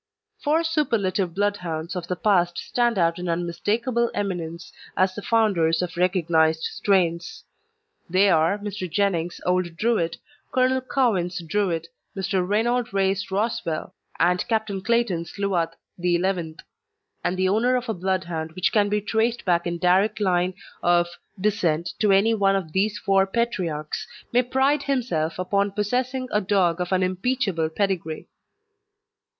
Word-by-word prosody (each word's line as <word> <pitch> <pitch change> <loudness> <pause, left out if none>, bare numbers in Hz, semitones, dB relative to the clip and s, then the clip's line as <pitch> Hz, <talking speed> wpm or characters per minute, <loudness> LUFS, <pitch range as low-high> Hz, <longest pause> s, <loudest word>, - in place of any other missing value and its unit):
Four 310 +3 +2
superlative 210 - 0
Bloodhounds 180 -4 -2
of 175 -1 -4
the 180 - -1
past 175 -3 +2
stand 240 -3 0
out 170 -1 +2
in 180 0 -3
unmistakable 220 +8 0
eminence 175 -4 -4 0.2
as 185 0 +3
the 205 - -6
founders 185 -8 +2
of 180 0 -5
recognised 165 -3 +2
strains. 175 -4 0 0.7
They 190 +3 +4
are 165 +2 +3
Mr. 205 -4 -5
Jenning's 175 -4 0
Old 180 -2 0
Druid, 205 -5 0 0.3
Colonel 260 0 +2
Cowen's 215 -9 0
Druid, 165 -2 -1 0.3
Mr. 190 -1 0
Reynold 235 +5 0
Ray's 195 +2 0
Roswell, 190 -5 -2 0.3
and 180 +1 +2
Captain 220 -4 -1
Clayton's 195 -7 0
Luath 180 -5 0 0.3
XI.; 175 -2 0 0.7
and 175 +1 -1
the 185 0 +2
owner 235 +6 +2
of 250 0 -2
a 225 - 0
Bloodhound 175 -4 -2
which 185 +1 0
can 205 -2 +3
be 210 0 0
traced 225 +3 0
back 175 -2 +2
in 170 0 -2
direct 190 +5 +2
line 185 -2 +1 0.3
of 175 0 +3 0.3
descent 185 -5 0
to 210 -2 +3
any 200 +4 +4
one 195 -2 +3
of 180 -5 -3
these 205 +4 +1
four 195 -1 +2
patriarchs 185 -9 -2 0.3
may 245 - +5
pride 265 +4 +1
himself 230 - -1
upon 200 +2 +1
possessing 250 +6 -1
a 210 - +2
dog 185 -3 +1
of 180 - -3
unimpeachable 185 -1 0
pedigree. 175 -3 -2
190 Hz, 140 wpm, -24 LUFS, 175-215 Hz, 0.7 s, may